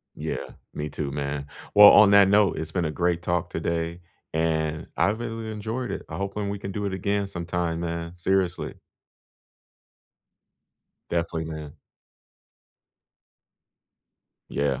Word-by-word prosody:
Yeah. - - -4 0.2
Me 75 +1 -4
too, 70 -1 -4
man. 70 0 -3 0.3
Well, 105 0 +11
on 105 -1 +7
that 100 -1 +7
note, 100 0 +4
it's 80 0 -4
been 90 -1 0
a 75 - -1
great 85 +1 0
talk 90 0 -1
today, 85 +1 -2 0.3
and 80 -1 0
I've 105 +3 +2
really 115 -1 -4
enjoyed 110 +4 -4
it. - - -4
I'm - - -5
hoping 100 +1 -3
we 100 - -4
can 100 0 -5
do 105 +1 -3
it 100 - -2
again 100 +2 -1
sometime, 85 -2 -2
man. 85 0 -4
Seriously. 95 0 0 2.3
Definitely, 85 -1 -1
man. 80 -2 -7 2.8
Yeah, 70 -2 0
85 Hz, 130 wpm, -25 LUFS, 80-100 Hz, 2.8 s, Well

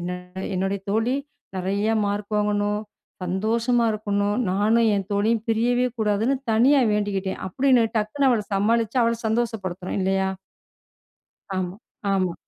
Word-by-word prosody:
என்ன 175 +1 -3 0.4
என்னுடைய 195 +2 -1
தோழி 225 +5 +1 0.4
நிறையா 200 +4 0
மார்க் 205 +1 -3
வாங்கணும், 205 0 +1 0.4
சந்தோஷமா 230 +6 +1
இருக்கணும், 205 0 -1
நானும் 220 +4 +3
என் 195 -2 -1
தோழியும் 215 +2 +1
பிரியவே 245 +3 +2
கூடாதுன்னு 220 +5 +1 0.2
தனியா 265 +5 +5
வேண்டிக்கிட்டேன்." 200 -2 -1
அப்படின்னு 255 +2 +3
டக்குனு 265 +6 +1
அவள 225 -3 +2
சமாளிச்சு 225 +4 +1
அவள 230 0 +2
சந்தோஷப்படுத்தணும், 210 -5 -2
இல்லையா? 190 0 +1 1.3
ஆமா. 185 +1 -3 0.4
ஆமா. 185 -3 +1
210 Hz, 115 wpm, -24 LUFS, 195-230 Hz, 1.3 s, தனியா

